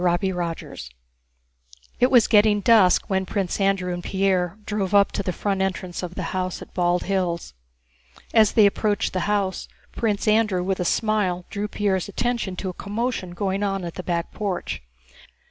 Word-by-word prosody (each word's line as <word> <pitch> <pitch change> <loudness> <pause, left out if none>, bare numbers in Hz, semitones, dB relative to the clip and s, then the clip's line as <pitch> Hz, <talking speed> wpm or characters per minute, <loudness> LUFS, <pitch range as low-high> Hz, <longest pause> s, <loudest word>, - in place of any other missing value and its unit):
CHAPTER 180 +2 +1 0.2
XIII - - -11 1.2
It 250 - +4
was 245 -4 +6
getting 210 -1 +4
dusk 210 -5 +5
when 190 -1 -1
Prince 195 0 -2
Andrew 195 -2 +1
and 175 0 -5
Pierre 190 -2 0
drove 205 -2 -1
up 200 0 +5
to - - -2
the 185 - -2
front 195 +1 -2
entrance 185 -2 -2
of 180 -1 -6
the - - -3
house 185 -1 -2
at - - -12
Bald 175 0 +1
Hills. 180 - -2 0.8
As 220 -2 +5
they 215 -3 +6
approached 205 +1 +1
the 185 - 0
house, 200 -2 -1 0.2
Prince 215 -2 -1
Andrew 210 -4 +3
with 190 0 -1
a 180 - -1
smile 190 -3 0
drew 205 +1 -2
Pierre's 200 -3 -1
attention 235 -3 -2
to 190 +1 -4
a - - -5
commotion 205 -2 -3
going 195 +1 -1
on 195 -2 -1
at 170 - -5
the - - -6
back 170 -1 -2
porch. 200 -4 -3
195 Hz, 175 wpm, -23 LUFS, 180-210 Hz, 1.2 s, was